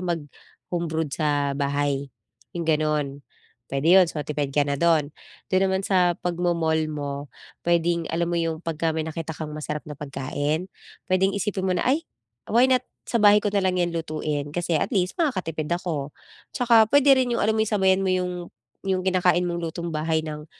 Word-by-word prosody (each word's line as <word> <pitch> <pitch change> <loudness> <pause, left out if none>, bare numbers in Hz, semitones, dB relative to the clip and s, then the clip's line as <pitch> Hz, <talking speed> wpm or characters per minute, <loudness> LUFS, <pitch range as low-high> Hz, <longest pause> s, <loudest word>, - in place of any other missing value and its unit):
mag-home-brewed 160 0 -4
sa 145 -3 0
bahay, 140 -1 -1 0.4
yong 170 -2 -4
gano'n, 150 -3 0 0.5
puwede 140 +4 0
'yon, 185 - +8
so 150 - -4
tipid 145 -1 -3
ka 145 - +2
na 140 - 0
do'n. 160 -2 +3 0.4
Dun 185 0 +2
naman 190 0 +1
sa 180 -3 +3
pag-mo-mall 170 -3 0
mo, 145 -1 -5 0.3
pwedeng 170 0 +2
alam 170 +1 0
mo 175 - -1
yung 165 -1 -1
pagka 165 -1 -1
may 160 0 -2
nakita 160 0 -5
kang 150 -1 -6
masarap 150 0 -4
na 150 - -7
pagkain, 145 +4 -3 0.4
pwedeng 190 +1 +2
isipin 200 -1 -2
mo 185 - +1
na, - - 0
"Ay, 305 +5 +2 0.5
why 245 +4 +5
not 255 -1 +3 0.2
sa 235 - 0
bahay 210 0 +7
ko 205 - -1
na 200 -2 +1
lang 185 -1 +1
yan 175 -1 +1
lutuin, 150 -2 -3
kasi 175 -1 0
at 250 - -1
least 185 -2 0
makakatipid 175 - -1
ako." 155 -5 -3 0.4
Tsaka 230 -3 +5
pwede 280 -1 +6
rin 255 -2 +1
yung 235 - 0
alam 220 +1 +2
mo - - +2
yung, 220 - -5
sabayan 190 -1 +3
mo 190 - +1
yung 180 -1 -3 0.3
yung 185 -1 +1
kinakain 180 -1 +2
mong 175 -1 -2
lutong-bahay 160 -1 -2
ng 150 0 -7
170 Hz, 180 wpm, -24 LUFS, 150-185 Hz, 0.5 s, yon